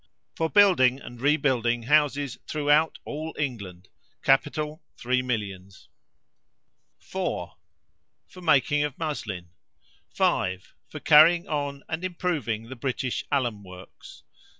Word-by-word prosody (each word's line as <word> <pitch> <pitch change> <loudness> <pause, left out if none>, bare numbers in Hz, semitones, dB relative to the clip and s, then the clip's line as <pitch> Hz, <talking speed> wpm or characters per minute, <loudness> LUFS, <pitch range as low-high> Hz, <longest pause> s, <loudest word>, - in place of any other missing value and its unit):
For 160 0 -1
building 155 -11 +5
and 120 -3 -11
rebuilding 130 -5 +1
houses 145 -1 +1
throughout 150 +1 +2
all 155 +2 -6
England 100 -10 -5 0.4
Capital, 150 +3 +1 0.2
three 125 +1 0
millions. 100 -6 -5 1.1
4. - - -4 0.7
For 185 - -14
making 145 -2 +3
of 150 -2 -4
muslin. 105 - -5 0.6
5. 95 +1 -1 0.2
For - - -8
carrying 165 +3 +6
on 145 -2 -3
and 160 +3 -4
improving 170 -11 -2
the 130 - -7
British 130 0 -3
alum 120 -7 -1
works. 90 -1 -13
140 Hz, 105 wpm, -26 LUFS, 115-155 Hz, 1.1 s, carrying